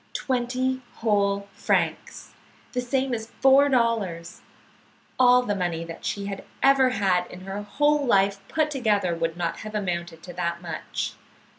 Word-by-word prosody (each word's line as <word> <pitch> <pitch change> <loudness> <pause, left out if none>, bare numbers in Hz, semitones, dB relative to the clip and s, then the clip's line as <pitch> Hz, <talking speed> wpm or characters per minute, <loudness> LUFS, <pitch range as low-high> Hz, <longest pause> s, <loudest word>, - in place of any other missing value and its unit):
Twenty 255 0 -1
whole 200 -2 +1
francs! - - -1 0.4
The 250 - 0
same 260 +1 -1
as 220 -1 -3
four 270 +2 +6
dollars! 225 -10 0 0.8
All 250 0 +6
the 210 - -1
money 175 -4 -2
that 165 0 -9
she 200 -1 -2
had 200 -1 -5 0.2
ever 270 -1 +5
had 190 -5 +1
in 180 - -11
her 195 +2 -5
whole 295 +7 +1
life 200 -5 +3
put 310 -1 0
together 210 -9 +1
would 165 0 -2
not 170 -1 -2
have 215 0 -8
amounted 170 -4 -3
to 175 - -9
that 170 -1 -2
much. 170 -3 -4
205 Hz, 150 wpm, -25 LUFS, 180-255 Hz, 0.8 s, four